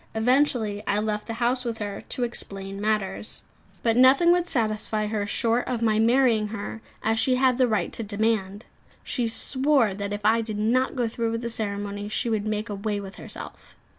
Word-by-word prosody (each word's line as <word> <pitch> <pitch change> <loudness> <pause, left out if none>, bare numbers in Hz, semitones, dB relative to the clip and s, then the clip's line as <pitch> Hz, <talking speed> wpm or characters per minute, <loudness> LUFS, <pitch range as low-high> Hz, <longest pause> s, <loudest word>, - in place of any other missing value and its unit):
Eventually 225 -3 +2
I 205 - +2
left 210 0 -2
the 225 - -4
house 245 +2 +1
with 235 -2 -3
her, 205 -2 -5
to 250 - -1
explain 195 -4 -5
matters. 210 -2 -2 0.4
But 230 -1 +2
nothing 265 +7 +6
would 355 0 +2
satisfy 215 -4 0
her 210 -1 -2
short 230 +3 +1
of 240 -3 -2
my 215 -1 +3
marrying 230 -2 +3
her, 220 +1 -6 0.2
as 225 +1 +1
she 255 +2 +3
had 255 -1 +2
the 255 - +5
right 215 -6 -1
to - - -3
demand. 210 -1 -1 0.4
She 245 -3 -1
swore 260 -1 +2
that 200 +1 -4
if 205 0 -3
I 225 +2 +4
did 220 -2 -4
not 245 +6 +1
go 245 -3 0
through 230 0 -2
with 230 - -2
the 235 -1 -4
ceremony, 205 -1 -3
she 230 +2 -1
would 215 -1 -1
make 215 +1 -2
away 205 0 -3
with 195 -1 -9
herself. - - -10
220 Hz, 195 wpm, -25 LUFS, 210-240 Hz, 0.4 s, nothing